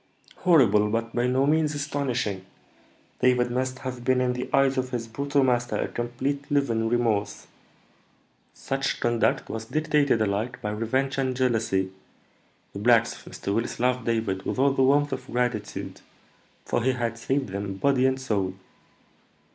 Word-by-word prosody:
"Horrible, 110 Hz, -, +4 dB
but 115 Hz, +1 st, -2 dB
by 120 Hz, +1 st, +1 dB
no 130 Hz, +2 st, +2 dB
means 155 Hz, 0 st, +2 dB
astonishing. 130 Hz, -9 st, -2 dB, 0.8 s
David 125 Hz, -1 st, +3 dB
must 130 Hz, +1 st, -1 dB
have 125 Hz, -2 st, -5 dB
been 130 Hz, +1 st, +2 dB
in 125 Hz, -1 st, +1 dB
the 125 Hz, 0 st, -4 dB
eyes 135 Hz, -1 st, +3 dB
of 130 Hz, 0 st, -2 dB
his 120 Hz, -2 st, -4 dB
brutal 140 Hz, +4 st, 0 dB
master 120 Hz, -1 st, +1 dB
a -, -, -1 dB
complete 130 Hz, +4 st, -3 dB
living 115 Hz, -6 st, +1 dB
remorse." 115 Hz, -4 st, 0 dB, 1.1 s
"Such 135 Hz, 0 st, -2 dB
conduct 120 Hz, -1 st, +1 dB
was 110 Hz, 0 st, -5 dB
dictated 150 Hz, -2 st, +1 dB
alike 110 Hz, +4 st, -1 dB
by 105 Hz, -, -3 dB
revenge 130 Hz, +6 st, -1 dB
and 130 Hz, -1 st, 0 dB
jealousy. 110 Hz, -7 st, +1 dB, 0.8 s
The 100 Hz, -, -6 dB
blacks 115 Hz, +1 st, +4 dB
of -, -, -13 dB
Mr. 100 Hz, -, -3 dB
Willis 115 Hz, +3 st, -2 dB
loved 125 Hz, -1 st, +1 dB
David 110 Hz, -5 st, 0 dB
with -, -, -3 dB
all 135 Hz, +2 st, +4 dB
the 135 Hz, -, 0 dB
warmth 145 Hz, +2 st, +3 dB
of -, -, -6 dB
gratitude, 120 Hz, -3 st, -3 dB, 0.6 s
for -, -, 0 dB
he 130 Hz, +3 st, +2 dB
had 115 Hz, -2 st, -3 dB
saved 135 Hz, 0 st, -1 dB
them 100 Hz, 0 st, -4 dB
body 130 Hz, +4 st, +2 dB
and 130 Hz, 0 st, 0 dB
soul. 100 Hz, -7 st, -1 dB
125 Hz, 155 wpm, -26 LUFS, 115-135 Hz, 1.1 s, Horrible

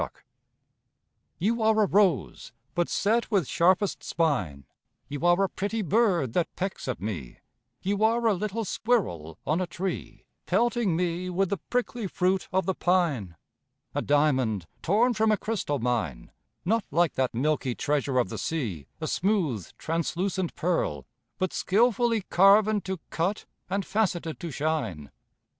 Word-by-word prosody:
NANCY -, -, -3 dB, 1.3 s
You 225 Hz, +6 st, 0 dB
are 220 Hz, 0 st, +4 dB
a -, -, +4 dB
rose, 190 Hz, -, +1 dB, 0.2 s
but 175 Hz, -1 st, 0 dB
set 225 Hz, +3 st, +1 dB
with 195 Hz, -, +2 dB
sharpest 185 Hz, +4 st, +2 dB
spine; 95 Hz, -, -1 dB, 0.4 s
You 145 Hz, +3 st, -6 dB
are 175 Hz, +3 st, +4 dB
a -, -, +3 dB
pretty 205 Hz, +4 st, -3 dB
bird 180 Hz, -, +2 dB
that 175 Hz, -, 0 dB
pecks 190 Hz, -5 st, -4 dB
at 130 Hz, -, -2 dB
me; 90 Hz, -, -5 dB, 0.5 s
You 200 Hz, +2 st, 0 dB
are 230 Hz, +2 st, +3 dB
a 220 Hz, -, +5 dB
little 210 Hz, +3 st, -2 dB
squirrel 90 Hz, -, -1 dB
on 160 Hz, +4 st, +1 dB
a 185 Hz, -, -1 dB
tree, 185 Hz, +1 st, -5 dB, 0.2 s
Pelting 230 Hz, -1 st, +2 dB
me 175 Hz, +1 st, -1 dB
with 185 Hz, +1 st, 0 dB
the 200 Hz, -, +1 dB
prickly 245 Hz, -3 st, -1 dB
fruit 185 Hz, +1 st, 0 dB
of 190 Hz, +1 st, +1 dB
the 190 Hz, -, +1 dB
pine; 160 Hz, -, +1 dB, 0.6 s
A -, -, 0 dB
diamond, 130 Hz, -, +2 dB, 0.2 s
torn 225 Hz, +8 st, +3 dB
from 220 Hz, 0 st, +2 dB
a 215 Hz, -, +3 dB
crystal 200 Hz, -11 st, -2 dB
mine, 110 Hz, -, -2 dB, 0.3 s
Not 225 Hz, +4 st, +2 dB
like 170 Hz, 0 st, +2 dB
that 130 Hz, -3 st, -1 dB
milky 135 Hz, -1 st, 0 dB
treasure 145 Hz, -2 st, 0 dB
of 120 Hz, -7 st, +2 dB
the -, -, -5 dB
sea 105 Hz, -, -3 dB
A 160 Hz, -, -3 dB
smooth, 165 Hz, -, 0 dB
translucent 175 Hz, +3 st, -2 dB
pearl, 75 Hz, -, -1 dB, 0.3 s
but 185 Hz, -1 st, -1 dB
skilfully 230 Hz, +2 st, +2 dB
Carven 205 Hz, +3 st, +5 dB
to 190 Hz, -2 st, -3 dB
cut, 185 Hz, +6 st, -1 dB, 0.2 s
and 195 Hz, +1 st, -1 dB
faceted 175 Hz, -, -1 dB
to 170 Hz, -, -5 dB
shine. 135 Hz, -, -2 dB
180 Hz, 150 wpm, -27 LUFS, 145-205 Hz, 1.3 s, a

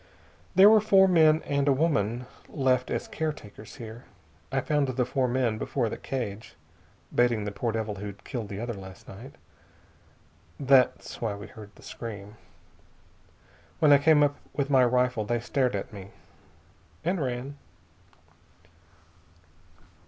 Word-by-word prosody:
There 190 Hz, +2 st, +8 dB
were 215 Hz, 0 st, +7 dB
four 195 Hz, -2 st, +5 dB
men 160 Hz, -3 st, +4 dB
and 140 Hz, 0 st, -1 dB
a -, -, +5 dB
woman 130 Hz, -5 st, 0 dB, 0.2 s
left 130 Hz, -3 st, +1 dB
as -, -, -3 dB
caretakers 145 Hz, -9 st, -6 dB
here. 115 Hz, +2 st, -10 dB, 0.5 s
I 135 Hz, -, +1 dB
found 145 Hz, +1 st, 0 dB
the 130 Hz, -1 st, 0 dB
four 130 Hz, +1 st, 0 dB
men 120 Hz, -3 st, 0 dB
before 120 Hz, 0 st, -1 dB
the -, -, -5 dB
cage, 115 Hz, -5 st, -5 dB, 0.6 s
baiting 120 Hz, -3 st, +2 dB
the 105 Hz, -, -3 dB
poor 105 Hz, +4 st, -2 dB
devil 110 Hz, -1 st, -3 dB
who'd 100 Hz, 0 st, -8 dB
killed 115 Hz, -5 st, -5 dB
the 100 Hz, -, -6 dB
other 120 Hz, +1 st, -3 dB
last 95 Hz, -2 st, -11 dB
night. 115 Hz, +8 st, -11 dB, 1.2 s
That's 135 Hz, -2 st, +2 dB
why 110 Hz, -3 st, -1 dB
we 100 Hz, 0 st, -9 dB
heard 105 Hz, -2 st, -12 dB
the -, -, -17 dB
scream. 105 Hz, -3 st, -8 dB, 1.4 s
When 150 Hz, -2 st, +5 dB
I 140 Hz, -, +7 dB
came 150 Hz, 0 st, +5 dB
up 145 Hz, 0 st, +1 dB, 0.2 s
with 140 Hz, 0 st, -2 dB
my 130 Hz, -2 st, +6 dB
rifle 125 Hz, -2 st, +1 dB
they 120 Hz, +3 st, -1 dB
stared 125 Hz, 0 st, 0 dB
at 100 Hz, -, -5 dB
me, 100 Hz, -1 st, -9 dB, 0.9 s
and 175 Hz, +1 st, 0 dB
ran. 130 Hz, +2 st, -4 dB
125 Hz, 145 wpm, -27 LUFS, 110-140 Hz, 1.4 s, There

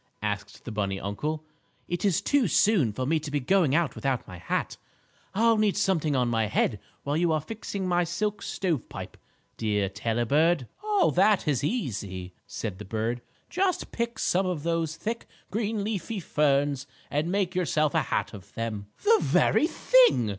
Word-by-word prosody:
asked 105 Hz, -1 st, -4 dB
the 120 Hz, -, -5 dB
bunny 100 Hz, -2 st, -1 dB
uncle. 150 Hz, +11 st, -3 dB, 0.4 s
"It 175 Hz, 0 st, -3 dB
is 195 Hz, -5 st, +2 dB
too 280 Hz, -6 st, +3 dB
soon 180 Hz, -, +3 dB
for 130 Hz, +5 st, -3 dB
me 160 Hz, +4 st, +2 dB
to 150 Hz, -, -6 dB
be 145 Hz, 0 st, 0 dB
going 150 Hz, +1 st, +3 dB
about 170 Hz, -3 st, +2 dB
without 135 Hz, -3 st, -2 dB
my 90 Hz, -2 st, -9 dB
hat. 90 Hz, -, -2 dB, 0.6 s
I'll 230 Hz, +2 st, +4 dB
need 215 Hz, -2 st, +2 dB
something 165 Hz, -8 st, +1 dB
on 125 Hz, -2 st, +2 dB
my 115 Hz, -2 st, +1 dB
head 105 Hz, 0 st, +1 dB, 0.2 s
while 145 Hz, +1 st, -1 dB
you 170 Hz, +1 st, +2 dB
are 155 Hz, -, +2 dB
fixing 200 Hz, +2 st, -5 dB
my 175 Hz, 0 st, +2 dB
silk 210 Hz, +4 st, -2 dB
stovepipe, 170 Hz, -, -3 dB, 0.4 s
dear 105 Hz, -3 st, 0 dB
Tailor 115 Hz, +4 st, -1 dB
Bird." 155 Hz, 0 st, +3 dB, 0.2 s
"Oh, 415 Hz, -3 st, +3 dB
that 195 Hz, 0 st, +3 dB
is 140 Hz, -3 st, +1 dB
easy," 100 Hz, -, -3 dB
said 100 Hz, -1 st, -5 dB
the -, -, -6 dB
bird. 115 Hz, +4 st, -2 dB, 0.3 s
"Just 365 Hz, +1 st, 0 dB
pick 235 Hz, -1 st, -2 dB
some 190 Hz, -3 st, +1 dB
of 170 Hz, -5 st, -2 dB
those 165 Hz, -2 st, 0 dB
thick, 225 Hz, +7 st, -4 dB, 0.2 s
green 215 Hz, 0 st, -1 dB
leafy 210 Hz, 0 st, -3 dB
ferns 145 Hz, -4 st, +1 dB, 0.2 s
and 155 Hz, +4 st, 0 dB
make 190 Hz, -2 st, 0 dB
yourself 155 Hz, -5 st, +1 dB
a -, -, +3 dB
hat -, -, -2 dB
of 100 Hz, -3 st, -12 dB
them." 110 Hz, -3 st, -3 dB, 0.2 s
"The 445 Hz, +1 st, +5 dB
very 315 Hz, -, +3 dB
thing!" -, -, +4 dB
155 Hz, 175 wpm, -27 LUFS, -, 0.6 s, The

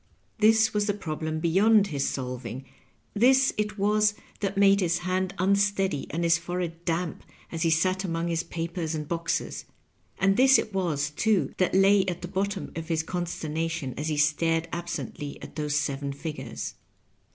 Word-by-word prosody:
This 220 Hz, 0 st, +4 dB
was 210 Hz, 0 st, +1 dB
the 205 Hz, -, +1 dB
problem 160 Hz, -4 st, -4 dB
beyond 200 Hz, +6 st, +4 dB
his 140 Hz, -1 st, 0 dB
solving; 125 Hz, -1 st, -5 dB, 0.5 s
this 260 Hz, +5 st, +4 dB
it 210 Hz, 0 st, -2 dB
was 210 Hz, +1 st, +2 dB, 0.2 s
that 195 Hz, -1 st, -2 dB
made 200 Hz, 0 st, +5 dB
his 175 Hz, -2 st, +1 dB
hand 185 Hz, +1 st, -1 dB
unsteady 195 Hz, -4 st, +1 dB
and 170 Hz, +3 st, -2 dB
his 165 Hz, -1 st, +4 dB
forehead 175 Hz, -1 st, -4 dB
damp 165 Hz, 0 st, -2 dB, 0.3 s
as 165 Hz, -, -4 dB
he 165 Hz, -, +3 dB
sat 185 Hz, +4 st, +2 dB
among 165 Hz, -2 st, -2 dB
his 165 Hz, -1 st, 0 dB
papers 165 Hz, -1 st, -4 dB
and 150 Hz, -1 st, -4 dB
boxes; 170 Hz, +1 st, -2 dB, 0.5 s
and 195 Hz, 0 st, +2 dB
this 265 Hz, +1 st, +7 dB
it 215 Hz, -, -3 dB
was, 155 Hz, -6 st, -1 dB
too, 215 Hz, +5 st, +1 dB
that 185 Hz, 0 st, +1 dB
lay 195 Hz, +1 st, +5 dB
at 180 Hz, -1 st, -3 dB
the -, -, -3 dB
bottom 195 Hz, +1 st, -2 dB
of 165 Hz, -1 st, -5 dB
his 160 Hz, -1 st, 0 dB
consternation 165 Hz, -4 st, -3 dB
as 150 Hz, -, -3 dB
he 155 Hz, -2 st, -1 dB
stared 165 Hz, +3 st, +2 dB
absently 165 Hz, -4 st, -5 dB
at -, -, -11 dB
those 150 Hz, -1 st, -1 dB
seven 140 Hz, -1 st, -1 dB
figures. 150 Hz, +2 st, -6 dB
170 Hz, 165 wpm, -27 LUFS, 160-195 Hz, 0.5 s, this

